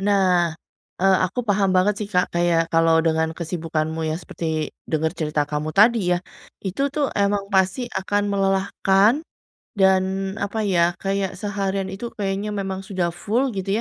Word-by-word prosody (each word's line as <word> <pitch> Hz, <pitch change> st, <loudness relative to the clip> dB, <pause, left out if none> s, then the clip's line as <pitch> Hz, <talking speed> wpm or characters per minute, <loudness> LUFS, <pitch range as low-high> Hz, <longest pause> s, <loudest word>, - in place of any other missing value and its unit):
Nah. 185 Hz, -4 st, +2 dB, 0.5 s
Eee, 195 Hz, -1 st, +5 dB
aku 210 Hz, +7 st, -3 dB
paham 200 Hz, -4 st, +1 dB
banget 185 Hz, +3 st, +3 dB
sih 210 Hz, -, -3 dB
Kak 180 Hz, -3 st, 0 dB
kayak 170 Hz, -1 st, +1 dB
kalau 165 Hz, 0 st, +4 dB
dengan 160 Hz, 0 st, +1 dB
kesibukanmu 160 Hz, -1 st, -3 dB
yang 155 Hz, -, -1 dB
seperti 160 Hz, -2 st, -3 dB, 0.2 s
denger 160 Hz, 0 st, 0 dB
cerita 150 Hz, -1 st, 0 dB
kamu 150 Hz, +1 st, -3 dB
tadi 210 Hz, -4 st, +4 dB
ya, -, -, 0 dB, 0.4 s
itu 195 Hz, +7 st, -3 dB
tuh 290 Hz, -2 st, 0 dB
emang 200 Hz, 0 st, 0 dB
pasti 195 Hz, +6 st, +1 dB
akan 205 Hz, +1 st, -1 dB
melelahkan, 195 Hz, +3 st, +2 dB, 0.6 s
dan 190 Hz, 0 st, +2 dB
apa 210 Hz, +2 st, -2 dB
ya, 175 Hz, -3 st, +3 dB
kayak 195 Hz, -1 st, -2 dB
seharian 195 Hz, -1 st, -2 dB
itu 230 Hz, +5 st, -6 dB
kayaknya 200 Hz, +1 st, -2 dB
memang 195 Hz, -2 st, -3 dB
sudah 185 Hz, -4 st, -2 dB
full 235 Hz, +8 st, -1 dB
gitu 195 Hz, +2 st, -1 dB
190 Hz, 150 wpm, -22 LUFS, 170-200 Hz, 0.6 s, Eee